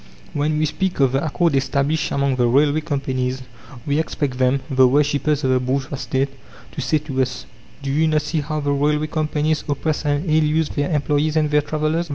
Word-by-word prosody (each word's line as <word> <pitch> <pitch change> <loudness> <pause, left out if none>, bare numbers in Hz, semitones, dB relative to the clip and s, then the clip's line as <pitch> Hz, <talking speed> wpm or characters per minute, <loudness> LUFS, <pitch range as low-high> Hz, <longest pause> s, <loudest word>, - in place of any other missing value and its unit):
When 150 +1 0
we 155 - +2
speak 185 +4 -2
of 135 -2 +4
the 135 +1 0
accord 165 +1 +1
established 140 +3 0
among 140 -2 0
the 120 -1 +3
railway 145 +5 +3
companies, 130 -3 -2 0.4
we 145 +1 +1
expect 145 -5 -2
them, 130 +1 +2
the 130 -1 +4
worshippers 145 +2 +1
of 130 - +2
the 130 - +3
bourgeois 135 +2 -2
State, 135 +1 -1 0.4
to - - -5
say 155 - +1
to 140 -3 -2
us: 130 -1 -3 0.4
"Do 135 - -2
you 155 +3 +2
not 155 -1 +1
see 155 +1 -1
how 155 +1 -3
the 145 0 0
railway 150 +2 +1
companies 155 0 -1
oppress 150 +2 -1
and 145 +2 0
ill 155 0 +3
use 155 +1 +1
their 145 -1 -2
employees 150 0 0
and 155 -1 +1
the 150 0 +4
travellers! 155 +3 -1
145 Hz, 205 wpm, -21 LUFS, 135-155 Hz, 0.4 s, of